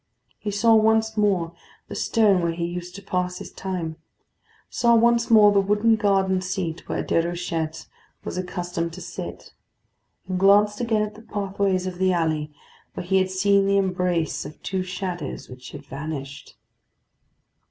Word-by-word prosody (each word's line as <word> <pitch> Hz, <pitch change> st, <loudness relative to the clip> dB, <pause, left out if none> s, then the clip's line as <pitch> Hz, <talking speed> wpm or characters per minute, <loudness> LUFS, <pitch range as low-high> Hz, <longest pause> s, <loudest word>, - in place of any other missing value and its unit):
He 210 Hz, -, -4 dB
saw 225 Hz, +3 st, +3 dB
once 220 Hz, 0 st, +3 dB
more 190 Hz, -6 st, +1 dB, 0.3 s
the -, -, -8 dB
stone 210 Hz, -5 st, +3 dB
where 170 Hz, -1 st, 0 dB
he 170 Hz, 0 st, -2 dB
used 175 Hz, +1 st, -6 dB
to 200 Hz, -, -9 dB
pass 180 Hz, -1 st, -2 dB
his -, -, -9 dB
time; 175 Hz, -4 st, -4 dB, 0.7 s
saw 235 Hz, -1 st, +3 dB
once 235 Hz, 0 st, +3 dB
more 215 Hz, -2 st, +7 dB
the 200 Hz, -, +4 dB
wooden 210 Hz, +3 st, +3 dB
garden 195 Hz, -3 st, +2 dB
seat 185 Hz, -3 st, -4 dB
where -, -, -1 dB
Déruchette 165 Hz, -2 st, -2 dB, 0.4 s
was -, -, -5 dB
accustomed 175 Hz, -2 st, -3 dB
to 185 Hz, -, -8 dB
sit, -, -, -8 dB, 0.7 s
and 185 Hz, -1 st, -2 dB
glanced 205 Hz, +3 st, +4 dB
again 225 Hz, -3 st, +1 dB
at 210 Hz, 0 st, -4 dB
the 220 Hz, -, -13 dB
pathway 200 Hz, -2 st, -1 dB
of 185 Hz, -1 st, -4 dB
the 190 Hz, 0 st, +3 dB
alley 155 Hz, -3 st, -1 dB, 0.4 s
where -, -, -5 dB
he 190 Hz, +2 st, +2 dB
had 190 Hz, 0 st, +1 dB
seen 195 Hz, +1 st, +3 dB
the 200 Hz, 0 st, +3 dB
embrace 180 Hz, -4 st, 0 dB
of 150 Hz, -, -10 dB
two 190 Hz, -1 st, -2 dB
shadows 185 Hz, -4 st, -5 dB
which 125 Hz, 0 st, -10 dB
had 145 Hz, 0 st, -10 dB
vanished. 140 Hz, -1 st, -7 dB
185 Hz, 160 wpm, -24 LUFS, 170-205 Hz, 0.7 s, more